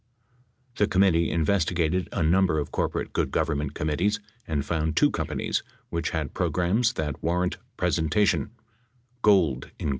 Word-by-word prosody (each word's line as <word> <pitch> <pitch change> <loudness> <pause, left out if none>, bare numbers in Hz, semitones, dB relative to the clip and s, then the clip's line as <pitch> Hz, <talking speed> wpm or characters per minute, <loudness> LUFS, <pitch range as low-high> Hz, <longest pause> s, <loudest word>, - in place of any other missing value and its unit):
The 105 - +3
committee 90 -3 +3
investigated 85 +1 +1
a - - -1
number 90 +1 +3
of 75 -2 -2
corporate - - -2
good - - 0
Government 70 0 -1
committees 90 +8 0 0.3
and 75 -3 -1
found 80 0 -1
two 145 - +5
companies 75 -4 -2 0.3
which 85 -1 -1
had 80 -4 -3
programs 90 +8 +1
that 75 - -3
war 85 +3 +1
rant 90 - -1 0.2
presentation: 100 +7 +1 0.7
Gould, 85 - +3
Inc. - - -2
85 Hz, 140 wpm, -26 LUFS, 75-95 Hz, 0.7 s, two